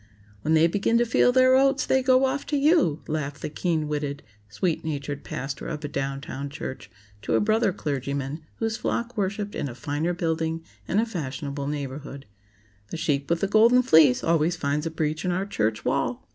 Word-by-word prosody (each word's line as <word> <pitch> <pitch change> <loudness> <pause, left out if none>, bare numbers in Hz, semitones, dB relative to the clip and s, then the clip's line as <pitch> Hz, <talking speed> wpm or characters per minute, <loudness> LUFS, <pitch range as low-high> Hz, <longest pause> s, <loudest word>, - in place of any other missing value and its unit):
"When 155 +8 +2
they 160 +1 +5
begin 205 +6 +2
to 240 - +3
feel 235 +2 +4
their 255 0 +5
oats 275 +1 +3
they 265 - +2
go 255 +1 +4
off 270 +2 -1
to 295 - 0
you!" 280 - +3
laughed 145 -2 -3
the - - -3
keen 160 -2 -1
witted, 145 -1 -3 0.3
sweet 160 - -1
natured 145 -2 -4
pastor 135 +1 -5
of 155 -2 -5
a - - -1
down 135 -1 -3
town 140 0 -6
church 140 -2 -7 0.3
to - - 0
a - - +4
brother 215 -1 +2
clergyman 140 -2 -3
whose 225 0 -2
flock 235 +1 -2
worshiped 205 0 -2
in 140 - -3
a 120 - -8
finer 150 +5 -2
building 165 -1 -1 0.2
and 200 - +1
a 225 - +2
fashionable 145 - -4
neighborhood. 140 -1 -5 0.6
"The 165 - -6
sheep 140 -3 -1
with 170 0 +1
the 195 - +2
golden 230 +5 +5
fleece 155 - +5
always 165 +1 +2
finds 150 0 -1
a - - -1
breach 155 -1 -2
in 180 - 0
our 185 +2 -1
church 110 - -1
wall." - - -1
160 Hz, 195 wpm, -25 LUFS, 140-210 Hz, 0.6 s, they